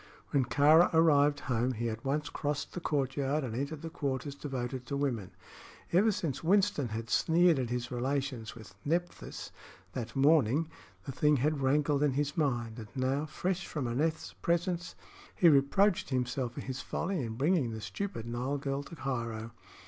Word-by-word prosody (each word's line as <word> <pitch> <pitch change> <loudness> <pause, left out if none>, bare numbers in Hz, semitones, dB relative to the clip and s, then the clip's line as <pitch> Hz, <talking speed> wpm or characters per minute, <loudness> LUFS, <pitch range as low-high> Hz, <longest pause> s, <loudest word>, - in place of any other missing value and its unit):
When 135 -3 +2
Kāra 155 +6 +5
arrived 145 -3 +4
home 125 0 0
he 120 0 -2
at 115 0 -4
once 150 +2 -1
crossed 145 -1 -3
the - - -4
courtyard 140 -1 0
and 120 -4 -4
entered 140 +4 -4
the 165 - -5
quarters 140 -2 -3
devoted 130 -3 -5
to 140 - -2
women. 120 -9 -1 0.6
Ever 205 +6 +5
since 150 -8 -3
Winston 190 -5 +3
had 115 +1 -5
sneered 170 -2 +4
at 125 -3 -2
his 120 0 -3
relations 130 -2 -2
with 110 -5 -12
Nephthys 175 +4 -3 0.4
that 120 -3 -5
morning, 145 +1 +4 0.4
the - - -4
thing 150 +3 +3
had 145 +2 0
rankled 145 +1 +2
in 145 -2 +3
his 145 +1 -1
mind, 120 -7 -1
and 110 - -8
now, 135 +3 0
fresh 180 +4 -2
from 145 -6 -3
Aneth's 155 +7 -1
presence, 175 +1 -1 0.4
he 175 - +5
reproached 175 +7 +4
himself 125 -1 -1
for - - -6
his 130 0 -5
folly 180 -2 -2
in 110 -1 -4
bringing 145 0 +2
the 110 -1 -5
stupid 195 - -5
Nile 125 +4 -2
girl 140 0 -2
to 155 +4 -10
Cairo. 115 -5 -3
140 Hz, 170 wpm, -31 LUFS, 125-155 Hz, 0.6 s, Kāra